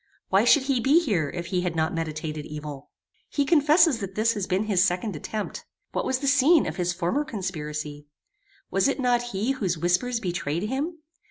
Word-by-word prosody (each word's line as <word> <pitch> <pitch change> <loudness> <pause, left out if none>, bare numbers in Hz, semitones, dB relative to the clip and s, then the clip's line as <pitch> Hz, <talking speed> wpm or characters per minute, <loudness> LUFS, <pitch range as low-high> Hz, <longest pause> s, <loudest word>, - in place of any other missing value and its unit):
Why - - +4
should 290 - +5
he 265 -2 +1
be 275 +7 +5
here 190 - 0
if 175 +2 -5
he 180 - +2
had 180 -2 -2
not 160 0 0
meditated 155 -2 -4
evil? 150 -2 -8 0.4
He 285 - 0
confesses 305 -2 +4
that 195 -2 -6
this 225 +2 +2
has 205 -3 -3
been 190 +2 +1
his 200 -4 +2
second 190 +1 0
attempt. 210 +7 -5 0.3
What - - -2
was 260 - +1
the 275 +1 -3
scene 285 +4 +5
of 160 +2 -4
his 180 -1 0
former 180 +11 -1
conspiracy? 150 - -5 0.6
Was 195 +4 +2
it 275 0 -1
not 245 -2 +2
he 215 +5 -1
whose 195 -10 -1
whispers 180 +9 +1
betrayed 175 -4 -2
him? 280 +10 -2
195 Hz, 190 wpm, -25 LUFS, 165-260 Hz, 0.6 s, should